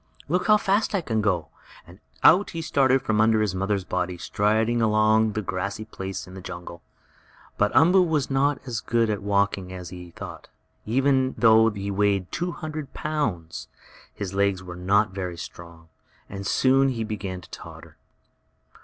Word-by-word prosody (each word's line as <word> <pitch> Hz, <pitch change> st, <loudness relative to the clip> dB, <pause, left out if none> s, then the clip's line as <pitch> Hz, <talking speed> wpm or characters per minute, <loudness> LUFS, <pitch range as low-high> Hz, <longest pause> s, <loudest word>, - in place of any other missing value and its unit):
"Look 180 Hz, +6 st, 0 dB
how 215 Hz, -1 st, +7 dB
fast 205 Hz, +1 st, +1 dB
I 195 Hz, -, +1 dB
can 110 Hz, -8 st, -1 dB
go!" 90 Hz, -6 st, 0 dB, 0.7 s
Out 190 Hz, +4 st, +6 dB
he 165 Hz, -, -5 dB
started 135 Hz, -3 st, +2 dB
from 110 Hz, -1 st, +1 dB
under 110 Hz, 0 st, +4 dB
his 105 Hz, -3 st, 0 dB
mother's 95 Hz, +1 st, -1 dB
body, 90 Hz, 0 st, -2 dB
striding 110 Hz, +6 st, +1 dB
across 110 Hz, 0 st, +3 dB
a -, -, +1 dB
grassy 100 Hz, +4 st, -4 dB
place 95 Hz, -3 st, -6 dB
in 90 Hz, -, -13 dB
the 95 Hz, -, -9 dB
jungle. 85 Hz, -1 st, -8 dB, 0.8 s
But -, -, +3 dB
Umboo 180 Hz, +5 st, +6 dB
was 155 Hz, -6 st, 0 dB
not 135 Hz, +1 st, +2 dB
as 120 Hz, -4 st, -3 dB
good 115 Hz, -2 st, +1 dB
at 105 Hz, -, -3 dB
walking 100 Hz, -2 st, 0 dB
as 90 Hz, -2 st, -7 dB
he 90 Hz, -1 st, -9 dB
had 85 Hz, -, -19 dB
thought. -, -, -9 dB, 0.4 s
Even 130 Hz, +2 st, +2 dB
though 110 Hz, -1 st, +6 dB
he 100 Hz, -1 st, -5 dB
weighed 100 Hz, -2 st, 0 dB
two 175 Hz, +1 st, -2 dB
hundred 155 Hz, -4 st, -7 dB
pounds 115 Hz, -, -3 dB, 0.4 s
his 100 Hz, -2 st, -6 dB
legs 100 Hz, -1 st, +1 dB
were 90 Hz, -1 st, -8 dB
not 100 Hz, +3 st, +2 dB
very 90 Hz, -3 st, -5 dB
strong, 85 Hz, -1 st, -10 dB, 0.4 s
and 100 Hz, 0 st, -6 dB
soon 135 Hz, +3 st, +3 dB
he 115 Hz, -4 st, -2 dB
began 95 Hz, -4 st, -5 dB
to 85 Hz, -, -16 dB
totter. -, -, -11 dB
105 Hz, 170 wpm, -25 LUFS, 95-130 Hz, 0.8 s, how